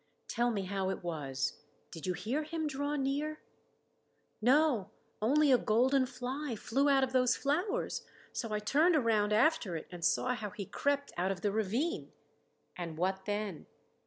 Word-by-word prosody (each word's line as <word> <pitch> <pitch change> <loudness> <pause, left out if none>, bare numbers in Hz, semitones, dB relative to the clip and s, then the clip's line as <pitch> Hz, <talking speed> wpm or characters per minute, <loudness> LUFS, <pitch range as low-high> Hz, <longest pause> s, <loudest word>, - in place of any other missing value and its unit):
"Tell 240 +1 +1
me 205 -4 -1
how 190 0 -1
it 190 - -4
was? 145 -4 -3 0.3
Did 165 +1 -7
you 180 - +1
hear 245 +11 -2
him 315 +1 -3
draw 285 0 -1
near?" 290 +2 -1 1.0
"No 255 -4 +3 0.3
Only 285 +6 +4
a 250 - +6
golden 255 +4 +3
fly 255 +1 -4
flew 270 +7 +1
out 270 -1 +4
of 260 -1 -1
those 250 -1 +4
flowers. 360 - -1 0.3
So 230 -3 -3
I 210 - +1
turned 300 +11 +3
around 220 -6 +2
after 225 - +3
it 160 - -5
and 175 -1 -8
saw 250 +8 +2
how 215 -4 -4
he 200 +1 -6
crept 280 +7 -1
out 185 +2 +1
of 185 -2 -4
the 205 - +1
ravine." 230 - -1 0.6
"And 170 -3 -5
what 190 +2 -1
then?" 205 -5 -3
240 Hz, 165 wpm, -32 LUFS, 195-285 Hz, 1.0 s, a